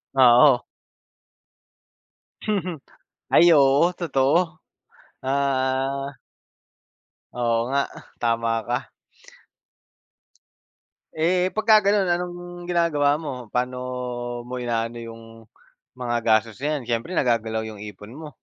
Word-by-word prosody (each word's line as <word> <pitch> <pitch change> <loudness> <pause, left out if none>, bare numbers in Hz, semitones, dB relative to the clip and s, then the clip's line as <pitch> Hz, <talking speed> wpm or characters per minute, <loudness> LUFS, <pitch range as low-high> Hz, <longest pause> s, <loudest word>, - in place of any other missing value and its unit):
Oo. 125 0 +6 1.8
Mhm, 185 -6 -1 0.5
Ay 170 -1 +6
oo, 140 +5 +4
totoo. 160 0 +1 0.6
Ah 135 0 -1 1.2
Oo 120 -1 0
nga, 140 +1 +2 0.4
tama 115 -1 +1 0.2
ka. 125 +2 -2 2.3
Eh, 180 +3 +2
pagkagano'n 210 -2 +4
anong 175 0 -1 0.3
ginagawa 150 -4 +2
mo? 130 -7 -7
Pa'no 125 +1 -2 0.6
mo 125 0 -5
inaano 115 0 -2
'yong, 115 0 -9 0.8
mga 120 -1 -1
gastos 110 +1 +1
na 150 +1 0
yan 135 - -7
siyempre 120 +10 -2
nagagalaw 110 -3 0
'yong 110 -2 -8
ipon 105 +2 -10
mo? 155 +1 -9
135 Hz, 90 wpm, -23 LUFS, 120-160 Hz, 2.3 s, Oo